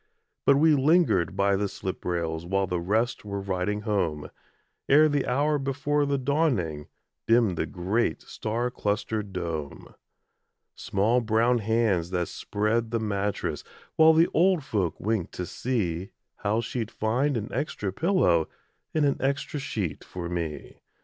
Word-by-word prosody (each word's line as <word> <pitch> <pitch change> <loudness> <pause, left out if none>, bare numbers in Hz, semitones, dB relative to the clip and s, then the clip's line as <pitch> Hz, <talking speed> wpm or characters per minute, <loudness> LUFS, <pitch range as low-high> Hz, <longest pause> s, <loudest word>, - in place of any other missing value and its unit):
But 140 - +7
we 155 +2 +5
lingered 140 - +3
by 100 0 +2
the 100 +1 0
slip 95 0 -5
rails 85 -2 -2
While 95 +3 0
the 90 -1 -2
rest 110 +7 0
were 100 -1 -4
riding 100 +2 -2
home, 95 -9 -1 0.6
Ere 150 +3 +7
the 145 -3 0
hour 145 +4 +1
before 145 +2 0
the 140 0 +1
dawning, 125 - 0 0.4
Dimmed 115 -5 +4
the - - -2
great 95 +6 -1
star 115 +3 -3
clustered 105 -1 -2
dome. 80 -5 -5 0.8
Small 110 +6 +1
brown 115 +2 +2
hands 105 -6 +1
that 90 -2 -1
spread 110 +2 -1
the 115 0 -1
mattress 105 -2 -2 0.3
While 160 0 +7
the 165 +2 +5
old 175 -1 +3
folk 100 - -1
winked 105 -4 -1
to 90 - -3
see 95 -7 -2 0.3
How 110 +3 0
she'd 115 -2 -3
find 125 +6 0
an 110 0 -5
extra 105 -10 -2
pillow 145 - +2 0.5
And 155 -2 +3
an 140 - +2
extra 140 +2 -1
sheet 105 - -3
for 90 -2 -6
me. 85 -3 -5
110 Hz, 145 wpm, -26 LUFS, 90-135 Hz, 0.8 s, But